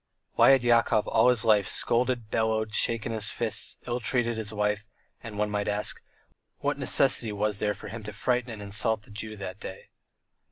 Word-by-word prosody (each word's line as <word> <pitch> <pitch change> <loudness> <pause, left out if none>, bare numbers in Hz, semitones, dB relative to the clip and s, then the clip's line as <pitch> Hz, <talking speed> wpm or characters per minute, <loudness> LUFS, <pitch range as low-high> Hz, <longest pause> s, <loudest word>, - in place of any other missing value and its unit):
Why - - +5
had 135 -2 +5
Yakov 115 -2 +3
all 115 +2 +4
his 120 -3 +2
life 105 -3 +4
scolded, 120 -2 0
bellowed, 110 -1 0
shaken 115 0 +1
his 110 -2 -1
fists, - - 0
ill 120 0 -2
treated 120 0 0
his 110 -1 -3
wife, 105 0 -1 0.3
and, 110 -2 -8
one 105 0 -1
might 105 0 -2
ask, 105 0 -1 0.6
what - - -2
necessity 115 -3 +3
was 105 0 -1
there 105 -1 0
for 105 - -9
him 115 +3 -7
to 105 - -5
frighten 125 +3 -1
and 110 -3 -7
insult 105 +2 0
the 105 - -15
Jew 110 +1 -5
that 95 0 -7
day? 95 - -10
110 Hz, 190 wpm, -27 LUFS, 105-115 Hz, 0.6 s, Why